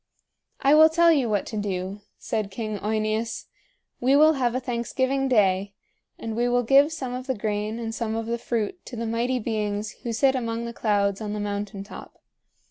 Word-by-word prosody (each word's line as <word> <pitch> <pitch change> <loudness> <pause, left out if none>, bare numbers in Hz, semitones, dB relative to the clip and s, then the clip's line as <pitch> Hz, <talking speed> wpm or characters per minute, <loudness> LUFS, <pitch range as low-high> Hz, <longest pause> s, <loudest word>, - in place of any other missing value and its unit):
"I 275 +1 +5
will 315 +1 +8
tell 335 +1 +5
you 275 -7 +2
what 205 -2 0
to 220 - -5
do," 195 0 -3 0.2
said 215 -3 -3
King 215 0 -4
OEneus. 215 +2 -2 0.5
"We 260 +3 +3
will 310 +2 +6
have 250 -4 0
a - - +1
thanksgiving 260 +2 -1
day, 200 -4 +2 0.4
and 225 -1 -5
we 240 +1 +1
will 245 0 +2
give 275 +5 +5
some 265 -6 -4
of 255 +1 -6
the 260 - 0
grain 210 +1 -2
and 225 -1 -4
some 225 -1 -2
of 225 0 -2
the 235 +1 -2
fruit 235 - -3
to 245 - -7
the 230 0 -3
Mighty 235 +3 0
Beings 210 -2 -2
who 235 - -3
sit 265 +4 +3
among 230 -2 -2
the 235 - -5
clouds 200 -2 0
on 210 -1 -3
the 210 - -3
mountain 205 -1 -4
top. 200 - -12
230 Hz, 200 wpm, -25 LUFS, 210-255 Hz, 0.5 s, will